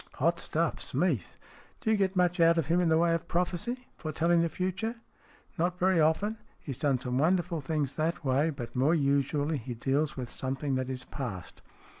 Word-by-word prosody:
" - - -31
Hot - - +3
stuff, - - -1
Smeath. - - -1 0.4
Do 220 - 0
you - - +5
get 195 -2 +1
much 180 0 +2
out 165 0 +5
of 165 - +2
him 170 +4 +2
in 175 - +2
the 160 - +4
way 170 0 +3
of 165 - -2
prophecy? 180 +9 -2
Foretelling 165 +2 +2
the 170 - +1
future? 190 +7 -2 0.2
" - - -29
" - - -34
Not 175 +2 +1
very 185 -1 +3
often. 200 +8 +1 0.2
He 145 - -7
has 130 - -7
done 140 -4 +3
some 125 0 -1
wonderful 175 +1 +1
things 145 -1 -2
that 160 0 -1
way, 135 +4 +2
but 135 -6 -6
more 140 +6 +3
usually 145 +1 +1
he 120 +1 -6
deals 140 +6 0
with 125 -2 -4
something 135 +3 -3
that 130 0 -1
is 130 -1 -5
past." 105 - -6
160 Hz, 210 wpm, -29 LUFS, 135-175 Hz, 0.4 s, you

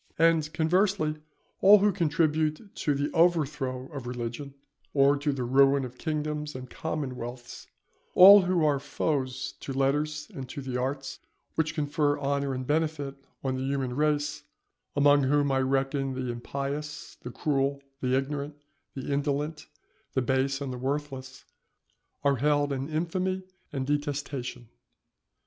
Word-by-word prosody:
And, 165 -2 +3
conversely, 160 0 +1 0.4
all 200 +2 +8
who 205 +1 +3
contribute 160 +1 0
to 145 - 0
the 145 +2 -1
overthrow 150 -7 +1
of 135 -4 -6
religion, 125 +3 -5 0.4
or 140 0 +5
to 145 +1 0
the 135 -2 -3
ruin 135 +2 +4
of 125 0 -10
kingdoms 150 -2 -3
and 130 0 -7
commonwealths, 125 -6 -5 0.5
all 200 +2 +10
who 180 -3 +1
are 145 -2 +2
foes 135 -2 -2
to - - -6
letters 145 +3 0
and 130 -3 -7
to 140 - -6
the 130 -2 -5
arts 135 +2 -3 0.3
which 155 -1 -1
confer 145 -1 +1
honour 140 -1 -1
and 130 0 -4
benefit 150 -1 0 0.3
on 130 -1 -1
the 130 - -3
human 135 -2 -1
race 150 0 0 0.5
(among 145 0 +5
whom 145 +1 +2
I 135 - +2
reckon 135 0 0
the 130 -1 -2
impious, 140 +5 -5
the - - -6
cruel, 140 +1 0 0.2
the 130 0 +1
ignorant, 140 +2 -3 0.4
the 135 +1 -3
indolent, 145 +2 -2 0.5
the 130 - +1
base 135 +2 0
and 135 -2 -3
the 125 - -6
worthless), 135 -1 -4 0.8
are 140 -1 +3
held 145 +1 +2
in 135 +2 -3
infamy 185 +4 -1 0.3
and 135 -2 -2
detestation. 145 -4 -3
140 Hz, 140 wpm, -28 LUFS, 135-150 Hz, 0.8 s, all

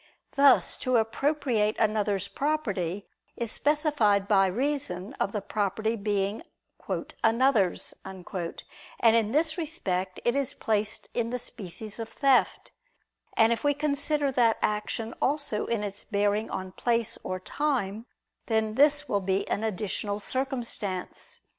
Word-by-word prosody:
Thus 280 -2 +5
to 255 -1 +1
appropriate 225 -2 +1
another's 210 -3 +1
property 205 - -2 0.3
is 235 -2 -2
specified 290 -10 +2
by 195 -2 +5
reason 215 -4 -2
of 195 - 0
the 210 -2 -3
property 215 +2 -1
being 205 0 -1 0.8
"another's," 225 -4 +3
and 190 -2 -9 0.8
in 225 -2 +5
this 315 +4 +1
respect 190 - -2
it 240 - +4
is 280 -2 0
placed 215 -1 -1
in 230 -1 0
the 250 - -2
species 215 -2 -8
of 225 0 -4
theft; 275 -1 +2 0.7
and 225 +1 +5
if 230 - -5
we 290 -1 +3
consider 290 0 0
that 235 -3 +3
action 215 +2 -1
also 280 -7 0
in 230 -3 -1
its 200 -1 -5
bearing 205 +1 0
on 185 0 -4
place 230 +2 0
or 185 0 -3
time, 230 -2 -2 0.4
then 220 -1 +1
this 290 +3 +4
will 200 - 0
be 190 +1 0
an 210 - -1
additional 210 -1 -2
circumstance. 235 -7 -4
220 Hz, 130 wpm, -28 LUFS, 200-270 Hz, 0.8 s, Thus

